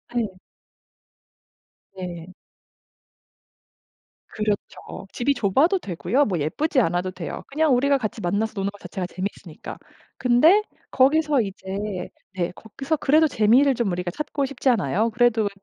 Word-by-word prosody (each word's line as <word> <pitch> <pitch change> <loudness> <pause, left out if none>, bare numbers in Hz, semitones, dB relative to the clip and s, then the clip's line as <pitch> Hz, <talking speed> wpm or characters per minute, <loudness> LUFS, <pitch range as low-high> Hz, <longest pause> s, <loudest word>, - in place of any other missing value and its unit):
예. 210 -6 -2 1.6
네. 175 -2 -7 2.0
그렇죠. 210 -2 -4
집이 270 +4 +1
좁아도 275 - +2
되고요. 245 - 0
뭐 180 -5 -1
예쁘지 265 - 0
않아도 180 -3 0
돼요. 180 -3 -6
그냥 300 0 +2
우리가 280 +3 +3
같이 220 -3 -4
만나서 205 +5 -1
노는 195 0 -1
거 205 - -15
자체가 190 -2 -5
재밌으니까. 185 -3 -7 0.4
근데 280 +11 +5 0.3
거기서 290 +1 +3
이제 195 -1 -5 0.3
네 175 -2 -1
거기서 270 +8 -4
그래도 310 +3 +4
재미를 260 +3 +4
좀 230 -5 0
우리가 175 0 -3
찾고 290 - -2
싶잖아요. 230 - +1
그래도 225 -2 +2
220 Hz, 280 characters per minute, -23 LUFS, 185-275 Hz, 2.0 s, 근데